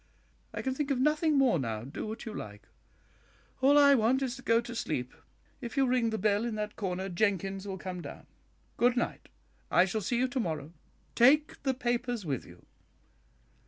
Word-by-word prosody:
I - - -5
can 265 - -1
think 285 +1 -2
of 270 -3 +1
nothing 300 +2 +2
more 255 - +4
now, 110 -4 -3
do 140 - -6
what 220 +2 -6
you 220 - -5
like; 105 - -8 0.9
all 280 +2 +6
I 285 -1 +7
want 260 +2 +3
is 255 -1 -2
to 265 - -11
go 230 -2 +3
to 235 0 -6
sleep. 125 - -3 0.5
If 240 +2 -7
you 270 - +4
ring 250 -2 +2
the 220 - -2
bell 210 0 +1
in 235 -2 -2
that 210 0 -4
corner, 190 -2 -3
Jenkins 195 +1 -1
will 190 -1 -4
come 185 -1 -6
down. - - -9 0.5
Good 245 +1 +3
night; 240 - -2 0.4
I 180 - +5
shall 215 +3 -2
see 230 +5 -1
you 255 +2 +2
to 255 - -2
morrow. 160 - -3 0.4
Take 295 +5 +4
the 265 -2 0
papers 245 -3 -2
with 135 -6 -3
you." 85 0 -16
230 Hz, 195 wpm, -30 LUFS, 185-260 Hz, 0.9 s, I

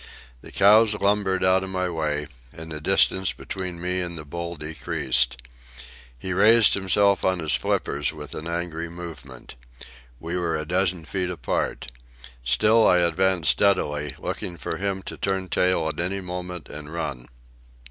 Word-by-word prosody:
The - - -12
cows 105 +2 +5
lumbered 100 -2 +1
out 95 +1 +4
of 95 - -5
my 90 -1 -1
way, 75 -3 -2 0.3
and 80 0 -10
the 75 -1 -6
distance 95 +1 +2
between 90 -2 -6
me 90 +1 -1
and 85 -1 -5
the 75 - -8
bull 85 +3 -5
decreased. 65 -5 -1 0.8
He 95 +8 -3
raised 110 +4 +6
himself 100 +1 +2
on 95 0 +2
his 80 -4 +1
flippers - - 0
with - - -9
an 80 - -6
angry 85 -1 -3
movement. 80 -7 -10 0.7
We 85 +2 -3
were 85 -2 -1
a 75 - -4
dozen 90 0 0
feet 90 +4 -2
apart. 75 -4 -3 0.5
Still 110 - +4
I 90 - +5
advanced 90 0 +2
steadily, 75 -8 +1
looking 85 - -5
for 70 - -4
him 95 -1 -2
to - - -8
turn 95 -1 -2
tail 90 -3 +2
at 80 - -4
any 95 +3 -1
moment 90 -1 -6
and 75 0 -9
run. 70 -7 -4
90 Hz, 160 wpm, -24 LUFS, 80-95 Hz, 0.8 s, raised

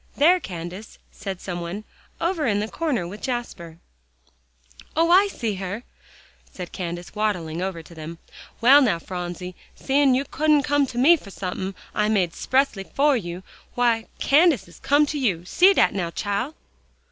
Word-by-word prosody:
"There, 345 +6 +5
Candace," 180 - -8
said 195 -3 -6
some 175 -2 -5
one, 175 +5 -5 0.4
"over 335 -4 0
in 205 -2 +1
the 210 - -2
corner 270 - -2
with 205 +4 -9
Jasper." 235 -10 -5 1.2
"Oh! 330 +1 +3
I 385 +3 +6
see 230 - -3
her," 200 +5 -4 0.7
said 180 -2 -8
Candace, 175 -1 -6
waddling 180 -6 -2
over 185 -3 -3
to 170 - -15
them. 160 +1 -8 0.4
"Well, 270 +5 +8
now, 225 -10 +2
Phronsie, 180 +1 -6 0.2
seein' 275 -1 +3
you 270 +2 0
couldn't 300 -1 +2
come 285 0 +2
to 245 - -8
me 310 +8 +6
for 210 - -13
somethin' 190 0 -5 0.2
I 210 0 +1
made 190 -6 +2
'xpressly 260 -8 0
fer 285 0 +3
you, 180 -5 -5 0.3
w'y, 235 -2 +2
Candace 290 - +4
has 175 - -16
to - - -22
come 290 +2 +4
to 295 0 -3
you. 185 -10 0
See 365 - +5
dat - - +3
now, 180 -4 -2
chile!" 205 - -3
215 Hz, 170 wpm, -23 LUFS, 180-280 Hz, 1.2 s, Well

